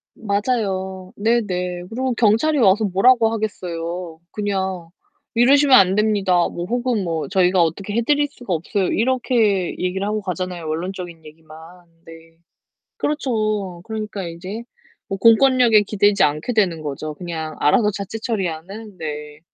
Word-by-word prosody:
맞아요. 200 Hz, -4 st, -2 dB
네네. 185 Hz, -5 st, -1 dB
그리고 255 Hz, +3 st, -2 dB
경찰이 235 Hz, +8 st, +2 dB
와서 215 Hz, -2 st, +4 dB
뭐라고 225 Hz, +4 st, +4 dB
하겠어요. 175 Hz, -5 st, -4 dB
그냥 190 Hz, -4 st, -3 dB, 0.5 s
"이러시면 270 Hz, +3 st, +6 dB
안 190 Hz, -1 st, +4 dB
됩니다." 200 Hz, -4 st, +2 dB
뭐 175 Hz, -, -5 dB
혹은 240 Hz, -2 st, -1 dB
뭐 165 Hz, -2 st, -3 dB
"저희가 185 Hz, -1 st, +3 dB
어떻게 190 Hz, +5 st, -2 dB
해 235 Hz, -, +1 dB
드릴 290 Hz, +4 st, +2 dB
수가 245 Hz, -8 st, -7 dB
없어요." 180 Hz, +4 st, -1 dB
이렇게 225 Hz, -6 st, +1 dB
얘기를 185 Hz, +2 st, -2 dB
하고 215 Hz, +1 st, -1 dB
가잖아요, 180 Hz, -3 st, -4 dB
원론적인 170 Hz, 0 st, -5 dB
얘기만. 155 Hz, 0 st, -14 dB, 0.5 s
네. 165 Hz, 0 st, -15 dB, 0.6 s
그렇죠. 215 Hz, -, -1 dB
그러니까 215 Hz, -2 st, -5 dB
인제 185 Hz, +7 st, -7 dB, 0.4 s
뭐 195 Hz, -, -2 dB
공권력에 230 Hz, 0 st, +5 dB
기대지 205 Hz, 0 st, +2 dB
않게 150 Hz, +10 st, -1 dB
되는 185 Hz, -8 st, +1 dB
거죠. 150 Hz, +1 st, -5 dB
그냥 160 Hz, -2 st, -6 dB
알아서 210 Hz, +8 st, +3 dB
자체 200 Hz, +2 st, -6 dB
처리하는. 200 Hz, -1 st, -5 dB
네. 150 Hz, -1 st, -6 dB
195 Hz, 315 characters per minute, -21 LUFS, 175-225 Hz, 0.6 s, 이러시면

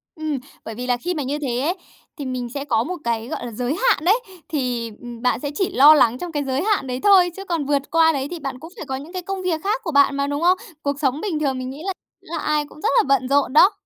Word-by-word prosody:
Ừm, 310 Hz, -3 st, -3 dB, 0.3 s
bởi 225 Hz, -, -6 dB
vì 250 Hz, +2 st, -5 dB
là 245 Hz, -, +2 dB
khi 355 Hz, +9 st, -2 dB
mà 300 Hz, -4 st, -2 dB
như 285 Hz, +3 st, -2 dB
thế 250 Hz, -5 st, -2 dB
ấy, 330 Hz, +8 st, 0 dB, 0.4 s
thì 285 Hz, -, -5 dB
mình 255 Hz, -2 st, -3 dB
sẽ 280 Hz, 0 st, -4 dB
có 230 Hz, -5 st, +1 dB
một 365 Hz, +8 st, -4 dB
cái, 230 Hz, -1 st, -1 dB
gọi 300 Hz, -, -5 dB
là, 240 Hz, -, -6 dB
giới 245 Hz, +6 st, -2 dB
hạn 425 Hz, -6 st, +2 dB
đấy. 410 Hz, +7 st, +4 dB, 0.3 s
Thì, 245 Hz, -6 st, -2 dB
ừm, 240 Hz, -1 st, -9 dB
bạn 250 Hz, -1 st, +1 dB
sẽ 285 Hz, +1 st, -4 dB
chỉ 380 Hz, +4 st, +1 dB
lo 300 Hz, -4 st, +8 dB
lắng 250 Hz, -5 st, +4 dB
trong 350 Hz, +4 st, -6 dB
cái 290 Hz, -2 st, -1 dB
giới 270 Hz, 0 st, -1 dB
hạn 410 Hz, -10 st, +1 dB
đấy 250 Hz, 0 st, -3 dB
thôi, 380 Hz, -3 st, +6 dB
chứ 390 Hz, -, -7 dB
còn 335 Hz, -6 st, -1 dB
vượt 280 Hz, 0 st, -1 dB
qua 325 Hz, 0 st, +5 dB
đấy 275 Hz, -3 st, -2 dB
thì 350 Hz, -, -5 dB
bạn 270 Hz, -3 st, -5 dB
cũng 325 Hz, +5 st, -11 dB
phải -, -, -6 dB
có 265 Hz, -2 st, -3 dB
những 290 Hz, +7 st, -8 dB
cái 370 Hz, -, -3 dB
công 380 Hz, +1 st, -4 dB
việc 335 Hz, -4 st, 0 dB
khác 425 Hz, +5 st, 0 dB
của 340 Hz, -, -3 dB
bạn 280 Hz, -1 st, +4 dB
mà, 280 Hz, 0 st, 0 dB
đúng 285 Hz, +1 st, -2 dB
không? 360 Hz, +2 st, +4 dB, 0.2 s
Cuộc 285 Hz, -1 st, -2 dB
sống 280 Hz, +1 st, 0 dB
bình 355 Hz, -8 st, -2 dB
thường 275 Hz, -3 st, 0 dB
mình 255 Hz, 0 st, -4 dB
nghĩ 275 Hz, +3 st, -8 dB
là 385 Hz, -, -1 dB, 0.3 s
là 330 Hz, +1 st, -6 dB
ai 300 Hz, -1 st, 0 dB
cũng 300 Hz, +1 st, -15 dB
rất -, -, +1 dB
là 460 Hz, -, +6 dB
bận 275 Hz, -2 st, +2 dB
rộn 280 Hz, -2 st, +2 dB
đó. 365 Hz, +6 st, +7 dB
290 Hz, 295 wpm, -22 LUFS, 260-340 Hz, 0.4 s, lo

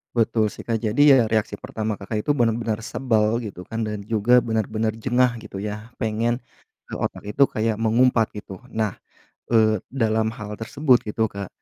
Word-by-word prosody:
Betul 115 Hz, -1 st, +2 dB
sih, -, -, -8 dB
Kak, 115 Hz, -1 st, -1 dB
jadi 110 Hz, +4 st, 0 dB
ya 140 Hz, -2 st, +8 dB
reaksi 110 Hz, -1 st, -1 dB
pertama 110 Hz, -1 st, -4 dB
Kakak 105 Hz, +2 st, -3 dB
itu -, -, +1 dB
benar-benar 115 Hz, -4 st, 0 dB
sebel 115 Hz, -1 st, 0 dB
gitu 95 Hz, -4 st, -8 dB
kan, 115 Hz, 0 st, -3 dB
dan 105 Hz, -1 st, -3 dB
juga 115 Hz, +3 st, +4 dB
benar-benar 110 Hz, -1 st, -1 dB
jengah 120 Hz, +2 st, +2 dB
gitu 105 Hz, -3 st, -8 dB
ya, 105 Hz, +3 st, -6 dB
pengen, 115 Hz, +1 st, 0 dB, 0.5 s
eee, -, -, -6 dB
otak -, -, -3 dB
itu 105 Hz, +7 st, +3 dB
kayak 110 Hz, -4 st, 0 dB
mengumpat 115 Hz, +1 st, +2 dB
gitu. 100 Hz, -3 st, -9 dB
Nah, 110 Hz, -3 st, -1 dB, 0.5 s
eee, 110 Hz, -3 st, +3 dB
dalam 110 Hz, -4 st, +1 dB
hal 105 Hz, -3 st, -7 dB
tersebut 130 Hz, +2 st, +3 dB
gitu, 110 Hz, +1 st, 0 dB
Kak, 100 Hz, -3 st, -6 dB
110 Hz, 170 wpm, -23 LUFS, 105-120 Hz, 0.5 s, ya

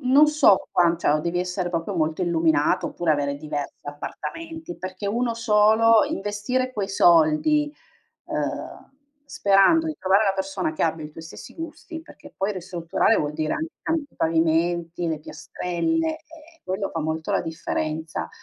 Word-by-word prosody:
non 275 Hz, +3 st, +5 dB
so, 300 Hz, -10 st, +4 dB
qua 170 Hz, -1 st, +3 dB
cioè 150 Hz, -, +1 dB
o 155 Hz, -, +1 dB
devi 170 Hz, +2 st, -2 dB
essere 180 Hz, 0 st, -2 dB
proprio 175 Hz, +3 st, -3 dB
molto 160 Hz, +2 st, 0 dB
illuminato 160 Hz, -3 st, +2 dB
oppure 175 Hz, -2 st, -2 dB
avere 140 Hz, -1 st, 0 dB
diversi 145 Hz, -1 st, -6 dB
appartamenti 320 Hz, -, -7 dB
perché 185 Hz, +2 st, -6 dB
1 235 Hz, +3 st, 0 dB
solo, 220 Hz, 0 st, +4 dB
investire 255 Hz, -1 st, -2 dB
quei 205 Hz, -3 st, -3 dB
soldi, 175 Hz, -, +4 dB, 0.5 s
uhm, -, -, -4 dB, 0.3 s
sperando 205 Hz, +8 st, +3 dB
di 315 Hz, -, -3 dB
trovare 190 Hz, +3 st, +3 dB
la 195 Hz, -, +2 dB
persona 190 Hz, -4 st, -2 dB
che -, -, -2 dB
abbia 160 Hz, -1 st, 0 dB
i -, -, -13 dB
tuoi 160 Hz, -, -11 dB
stessi 160 Hz, -, -11 dB
gusti, 325 Hz, 0 st, -8 dB
perché 300 Hz, -2 st, -15 dB
poi 195 Hz, +2 st, -1 dB
ristrutturare 180 Hz, +3 st, 0 dB
vuol 150 Hz, 0 st, -1 dB
dire 155 Hz, 0 st, -1 dB
anche 320 Hz, +1 st, -4 dB
cam 325 Hz, -, 0 dB
i 290 Hz, -3 st, -7 dB
pavimenti, 165 Hz, +1 st, 0 dB
le 160 Hz, -, -2 dB
piastrelle, 320 Hz, -, -2 dB
eh, 325 Hz, +1 st, -18 dB
quello 190 Hz, +1 st, -3 dB
fa 165 Hz, -, -3 dB
molto 160 Hz, +1 st, -3 dB
la -, -, +2 dB
differenza. 160 Hz, -1 st, -3 dB
185 Hz, 160 wpm, -24 LUFS, 160-255 Hz, 0.5 s, non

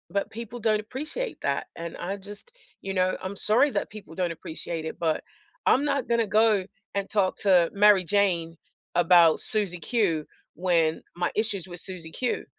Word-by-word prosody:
But 200 Hz, +2 st, -1 dB
people 235 Hz, +1 st, -7 dB
don't 215 Hz, -1 st, +2 dB
appreciate 300 Hz, -, -5 dB
that, -, -, -1 dB
and 170 Hz, 0 st, -6 dB
I 195 Hz, +3 st, -4 dB
just 205 Hz, -, -10 dB, 0.3 s
You 195 Hz, -, -4 dB
know, 185 Hz, 0 st, +1 dB
I'm 190 Hz, +2 st, -4 dB
sorry 225 Hz, +8 st, +3 dB
that -, -, -2 dB
people 210 Hz, -6 st, -11 dB
don't 180 Hz, -1 st, 0 dB
appreciate 160 Hz, 0 st, -5 dB
it, 160 Hz, -, -5 dB
but 160 Hz, -2 st, 0 dB, 0.4 s
I'm 275 Hz, +3 st, +4 dB
not 280 Hz, -3 st, 0 dB
gonna 235 Hz, -1 st, +2 dB
go 215 Hz, -2 st, +3 dB, 0.3 s
and 200 Hz, 0 st, -1 dB
talk 195 Hz, -3 st, +1 dB
to 180 Hz, -4 st, +4 dB
Mary 205 Hz, -2 st, +6 dB
Jane 175 Hz, -4 st, +1 dB, 0.4 s
about 170 Hz, -2 st, +6 dB
Susie 200 Hz, -6 st, -1 dB
Q, 170 Hz, -5 st, 0 dB, 0.3 s
when 165 Hz, -2 st, +1 dB
my 175 Hz, 0 st, -1 dB
issues 205 Hz, -5 st, -1 dB
with 175 Hz, -1 st, -9 dB
Susie 180 Hz, -4 st, -7 dB
Q 250 Hz, +8 st, -2 dB
195 Hz, 170 wpm, -26 LUFS, 170-215 Hz, 0.4 s, Mary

